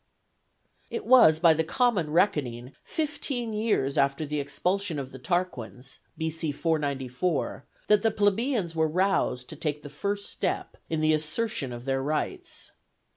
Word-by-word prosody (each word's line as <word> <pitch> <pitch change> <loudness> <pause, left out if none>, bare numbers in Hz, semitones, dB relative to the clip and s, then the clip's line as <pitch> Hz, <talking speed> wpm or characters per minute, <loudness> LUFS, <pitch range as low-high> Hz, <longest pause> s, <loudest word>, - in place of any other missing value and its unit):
] - - -44
It 445 -2 -4
was, 235 -12 +7
by 165 0 +6
the 160 +1 +1
common 200 - +1
reckoning, 140 - +1
fifteen 275 -7 -2
years 210 -11 +1
after 140 +2 +1
the 150 0 -2
expulsion 175 +5 -1
of 135 -2 -5
the 130 - -10
Tarquins 130 -5 -3 0.2
(B.C. 160 -1 -2
494), 140 -1 -1 0.2
that 210 -1 +4
the 225 - +3
plebeians 205 -3 +1
were 160 0 +3
roused 165 -8 +1
to - - -7
take 150 -1 -3
the 145 - -8
first 200 +8 -3
step - - -2
in 160 -1 -1
the 155 0 +4
assertion 155 - -1
of 120 0 -7
their 135 0 0
rights. 245 - -3
160 Hz, 150 wpm, -27 LUFS, 140-205 Hz, 0.2 s, was